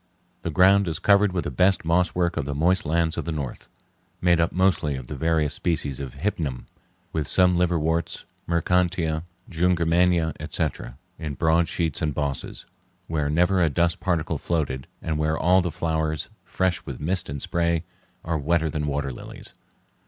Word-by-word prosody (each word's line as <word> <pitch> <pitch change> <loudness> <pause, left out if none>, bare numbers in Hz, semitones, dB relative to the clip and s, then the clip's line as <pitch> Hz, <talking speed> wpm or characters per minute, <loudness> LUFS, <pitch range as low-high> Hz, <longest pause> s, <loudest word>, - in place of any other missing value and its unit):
The - - -3
ground 95 +4 +5
is 80 -3 -2
covered 100 +2 +4
with 90 -2 -1
the - - -4
best 95 -1 +2
moss 85 +2 +2
work 85 -1 +1
of - - -2
the 70 0 -3
moist 90 +5 +2
lands 80 +1 +1
of - - -3
the 85 - -2
north, 70 -5 -5 0.5
made 85 -1 +3
up 85 - +2
mostly 90 -6 +1
of 65 -2 -6
the 75 - -6
various 80 0 +1
species 75 -7 -2
of 70 -2 -6
hypnum, 70 -6 -3 0.5
with 75 -3 -1
some 90 -1 +4
liverworts, 85 -1 0 0.2
marchantia, 85 -1 +1 0.2
jungermannia, 85 -1 +2
etc., 75 -4 -3 0.2
in 75 -3 -4
broad 80 +3 +2
sheets 80 -3 -1
and 75 -4 -1
bosses, 70 -3 -3 0.4
where 75 -4 -1
never 90 +4 +3
a 85 - +4
dust 85 +3 +1
particle 85 -4 -1
floated, 70 -6 -2 0.2
and 80 -2 -1
where 80 +1 +1
all 90 +3 +4
the 90 - -1
flowers, 80 -2 -2
fresh 90 -3 -1
with 70 -5 -7
mist 85 +1 -1
and 70 0 -4
spray, 85 -1 0 0.4
are 80 -1 -1
wetter 80 +2 +1
than 75 -1 -2
water 70 -1 -1
lilies. - - -10
80 Hz, 170 wpm, -24 LUFS, 75-90 Hz, 0.5 s, ground